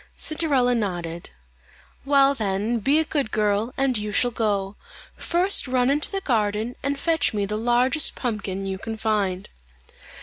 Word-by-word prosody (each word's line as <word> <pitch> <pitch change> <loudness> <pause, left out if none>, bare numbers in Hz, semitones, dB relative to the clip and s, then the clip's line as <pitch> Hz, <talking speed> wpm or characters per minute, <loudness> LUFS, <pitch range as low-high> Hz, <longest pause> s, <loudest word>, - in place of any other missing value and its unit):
Cinderella 285 -6 +1
nodded. 175 -7 -3 0.8
"Well, 275 0 +4
then, 215 0 -1
be 275 +7 +2
a 320 - +3
good 285 -6 -1
girl, 210 +2 0
and 270 -2 +1
you 210 0 -4
shall 245 +4 +2
go. 205 -3 -1 0.4
First 360 -1 +1
run 255 0 +2
into 295 +2 +2
the 390 -1 -3
garden 220 - -1
and 280 0 -1
fetch 320 -7 +1
me 205 -1 0
the 210 +2 -3
largest 245 +6 +2
pumpkin 200 -5 -3
you 190 -1 -4
can 225 +1 -5
find." 205 -4 -1
230 Hz, 155 wpm, -24 LUFS, 205-275 Hz, 0.8 s, Well